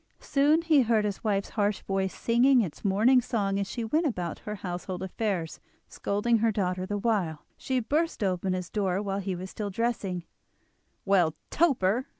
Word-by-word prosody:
Soon 295 +4 +2
he 315 -4 +5
heard 225 -3 +2
his 205 -2 -3
wife's 200 -3 0
harsh 205 -2 0
voice 195 -1 -1
singing 245 +2 +3
its 175 -9 -5
morning 220 +6 +4
song 200 -5 -1
as 200 - -1
she 235 - -4
went 310 +9 +1
about 180 - -3
her 210 - -5
household 180 -1 -5
affairs, 190 -4 -3 0.3
scolding 220 +3 0
her 225 +1 +2
daughter 185 -2 -1
the 205 - -2
while. 195 -8 -1
She 260 -1 -1
burst 300 +2 -1
open 185 -1 0
his 180 -2 -4
door 195 -3 0
while 195 -1 -2
he 190 -1 -3
was 185 +2 -7
still 210 -2 -4
dressing: 200 -4 -2 0.8
"Well, 180 -5 +3 0.2
Toper!" 260 - +2
205 Hz, 170 wpm, -28 LUFS, 185-235 Hz, 0.8 s, he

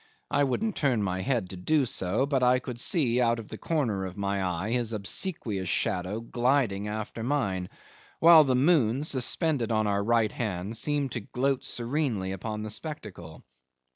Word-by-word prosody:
I 145 0 +3
wouldn't 210 - -1
turn 125 -7 +1
my 95 -1 -1
head 115 -6 -1
to - - -7
do 145 - +2
so; 105 +2 0
but 140 -2 0
I 125 0 +5
could 125 -2 -6
see 125 -4 +2
out 120 -1 +2
of 115 -3 -8
the - - -7
corner 115 - -1
of 95 +2 -10
my 100 -1 -1
eye 90 +4 -2
his 120 -2 0
obsequious 105 - -2
shadow 95 +5 -1
gliding 120 -4 +1
after 110 +2 -5
mine, 105 -9 -1 0.5
while 165 -1 +8
the 130 -3 +1
moon, 135 -3 +3
suspended 140 -2 0
on 110 -1 +2
our 100 -1 +1
right 115 -1 +2
hand, 105 -2 -3
seemed 145 0 -1
to - - -3
gloat 130 +5 -1
serenely 120 -6 -2
upon 105 +3 -4
the 110 - -5
spectacle. 105 - -8
115 Hz, 170 wpm, -28 LUFS, 100-135 Hz, 0.5 s, while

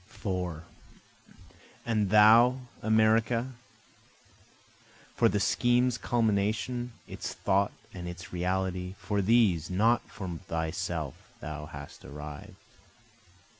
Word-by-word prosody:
4 90 -5 -4 1.2
And 110 -4 +1
thou 115 +5 +6 0.2
America, 110 +3 +2 1.6
For - - +4
the - - 0
scheme's 120 0 +2
culmination, 115 +2 0
its - - -6
thought 100 +1 +1 0.2
and 90 -1 -6
its 90 +3 -8
reality, 90 +1 -2
For 100 -1 -1
these 95 -6 +3
(not 110 +6 +3
for 95 - -7 0.2
thyself) 80 -2 -2 0.3
thou 75 0 -6
hast 70 -2 -10
arrived. 75 0 -9
100 Hz, 95 wpm, -29 LUFS, 90-115 Hz, 1.6 s, thou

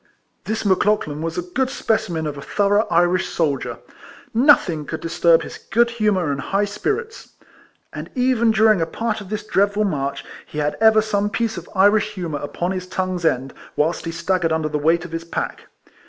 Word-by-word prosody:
This 220 0 -2
Mc 190 -2 +3
Lauchlan 155 -8 0
was 165 0 -3
a 180 - -1
good 255 +9 -1
specimen 175 - -1
of 150 -1 -3
a 140 - -8
thorouo^h 205 +6 +1
Irish 175 +2 +2
soldier. 145 -5 -1 0.6
Nothin^r 225 - +4
could 160 - -4
disturb 165 0 +3
his - - -9
good 235 +3 +1
humour 210 -9 +1
and 140 0 -3
high 200 +6 0
spirits; 425 - -4 0.6
and - - -7
even 250 -2 +2
during 215 -3 +4
a 165 - 0
part 220 +5 -3
of 195 - -10
this 215 0 -4
dreadful 205 0 +2
march, 140 -7 -2 0.2
he - - -9
had 150 0 0
ever 220 -1 +6
some 205 -1 0
piece 230 +1 -1
of - - -8
Irish 205 +2 +3
humour 170 -6 -4
upon 175 +5 -3
his 185 -1 -4
tongue's 185 -2 -2
end, 135 -3 0 0.2
whilst 160 +3 0
he 165 - -3
staggered 170 0 0
under 160 -1 0
the 150 0 -2
weight 165 +3 +2
of 175 - -9
his 165 0 -4
pack. 170 - -5
185 Hz, 190 wpm, -21 LUFS, 165-215 Hz, 0.6 s, ever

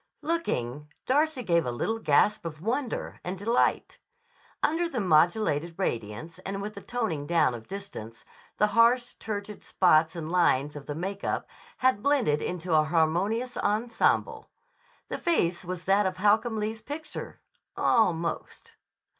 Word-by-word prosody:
Looking, 150 - -2 0.2
Darcy 290 0 +1
gave 170 -4 +2
a 125 - -2
little 225 - -2
gasp 205 +4 +3
of 160 -2 -6
wonder 240 - -3
and 180 +2 -4
delight. 230 +6 0 0.6
Under 335 +2 +1
the 260 - -3
modulated 170 -2 +2
radiance 120 - -3
and 195 +1 -5
with 210 +2 -5
the 200 - -9
toning 200 -14 -3
down 165 -6 +3
of 115 -2 -9
distance, 190 - -8 0.3
the - - +4
harsh, 230 +3 +3
turgid 210 -1 -5
spots 165 -2 +3
and 165 -2 -5
lines 150 -5 +2
of 145 - -9
the 145 - -4
make 195 +5 -4
up - - -2 0.3
had 255 -5 +2
blended 250 - +2
into 180 -1 -3
a 155 -1 +5
harmonious 175 +10 +1
ensemble. 240 - 0 0.6
The - - -4
face 180 - +1
was 180 -1 -6
that 195 +1 +3
of 185 -1 -4
Holcomb 220 +4 +2
Lee's 215 +1 -3
picture—almost. 225 - -2
195 Hz, 140 wpm, -27 LUFS, 160-230 Hz, 0.6 s, a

